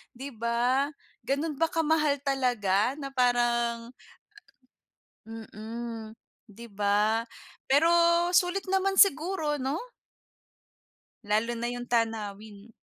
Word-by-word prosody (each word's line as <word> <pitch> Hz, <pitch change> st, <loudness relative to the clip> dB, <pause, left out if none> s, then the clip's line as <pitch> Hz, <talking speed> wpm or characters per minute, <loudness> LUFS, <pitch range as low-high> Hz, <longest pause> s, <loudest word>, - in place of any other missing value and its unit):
'Di 270 Hz, +3 st, -7 dB
ba? 240 Hz, +4 st, 0 dB, 0.4 s
Gano'n 290 Hz, +2 st, -2 dB
ba 330 Hz, -, +3 dB
kamahal 305 Hz, -3 st, +1 dB
talaga 245 Hz, -4 st, +1 dB
na 275 Hz, -2 st, -7 dB
parang 240 Hz, -2 st, +1 dB, 1.3 s
Mm. 225 Hz, 0 st, -8 dB, 0.3 s
'Di 230 Hz, +3 st, -12 dB
ba? 210 Hz, +3 st, +1 dB, 0.4 s
Pero 285 Hz, +5 st, +4 dB, 0.4 s
sulit 360 Hz, +2 st, +2 dB
naman 385 Hz, 0 st, +1 dB
siguro, 320 Hz, -4 st, +3 dB
'no? 270 Hz, +4 st, -2 dB, 1.5 s
Lalo 220 Hz, +3 st, +1 dB
na 235 Hz, -, -2 dB
yung 245 Hz, 0 st, -6 dB
tanawin. 215 Hz, -2 st, -3 dB
240 Hz, 95 wpm, -28 LUFS, 225-285 Hz, 1.5 s, Pero